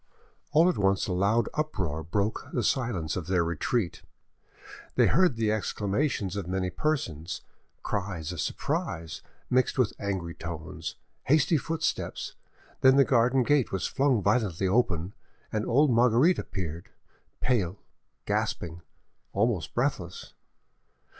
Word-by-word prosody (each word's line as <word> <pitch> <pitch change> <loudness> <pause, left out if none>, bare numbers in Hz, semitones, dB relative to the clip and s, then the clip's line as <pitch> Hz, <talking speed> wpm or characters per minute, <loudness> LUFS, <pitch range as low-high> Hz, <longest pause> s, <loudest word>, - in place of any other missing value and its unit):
All 160 +4 +5
at 180 - +1
once 95 -1 +2
a 95 - -2
loud 100 +5 +2
uproar 95 - -2
broke 100 +7 -1
the 120 - -1
silence 100 - 0
of 85 -4 -4
their 90 -2 +2
retreat; 85 - -1 0.9
they - - +5
heard 180 -8 +4
the 110 -2 +1
exclamations 105 - -1
of 100 -4 -4
many 95 0 -1
persons, 90 - -2 0.4
cries 90 -5 -3
of 90 - -3
surprise 80 0 -3 0.3
mixed 130 +2 +2
with 125 -5 +2
angry 95 -5 -3
tones, 80 -1 -6 0.3
hasty 155 +4 +4
footsteps, 160 +2 -2 0.5
then 130 0 +6
the 140 -1 +6
garden 125 +1 +3
gate 145 -1 +2
was 95 -2 -1
flung 135 -6 +2
violently 100 -4 +1
open, 95 -4 +1 0.4
and 110 0 -1
old 140 +4 +4
Marguerite 125 +8 +4
appeared, 85 -3 -5 0.5
pale, 105 -7 +1 0.5
gasping, 85 0 -2 0.5
almost 100 -7 0
breathless. 110 -9 -2
105 Hz, 125 wpm, -28 LUFS, 90-125 Hz, 0.9 s, then